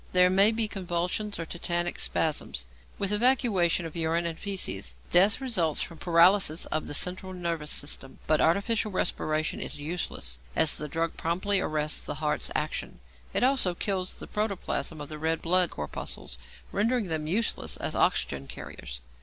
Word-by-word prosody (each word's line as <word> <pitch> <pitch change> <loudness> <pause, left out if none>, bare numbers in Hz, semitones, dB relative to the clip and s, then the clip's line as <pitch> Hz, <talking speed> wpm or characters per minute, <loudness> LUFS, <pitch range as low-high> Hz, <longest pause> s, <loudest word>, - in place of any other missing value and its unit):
There 180 0 +5
may 195 +3 +6
be 225 -1 +1
convulsions 185 +2 -2
or 165 - -4
tetanic 175 +1 -1
spasms, 145 - 0 0.3
with 200 0 -1
evacuation 210 -7 +3
of 165 - -7
urine 165 +1 0
and 165 -1 -2
fæces. 100 - -3 0.2
Death 195 +6 +5
results 190 - +1
from 165 -3 -9
paralysis 170 0 +4
of 155 - -2
the 145 - -4
central 185 +3 +1
nervous 170 -4 -3
system, 135 -2 -1
but 155 - +3
artificial 210 +6 +2
respiration 155 -4 -1
is - - -3
useless, 145 - -3 0.2
as 160 -2 +4
the 150 - -4
drug 165 +3 -2
promptly 185 +4 +1
arrests 155 -3 0
the 145 - -5
heart's 150 0 -1
action. - - -2 0.3
It - - +1
also 255 -9 +2
kills 185 -1 -1
the - - -7
protoplasm 200 -6 -2
of 145 - -6
the 155 0 -7
red 160 +1 0
blood 180 +1 +3
corpuscles, 75 -3 -4 0.3
rendering 230 +2 +1
them 160 -3 -3
useless 210 +7 -1
as - - -3
oxygen 70 -1 +1
carriers. - - -8
170 Hz, 160 wpm, -28 LUFS, 155-195 Hz, 0.3 s, may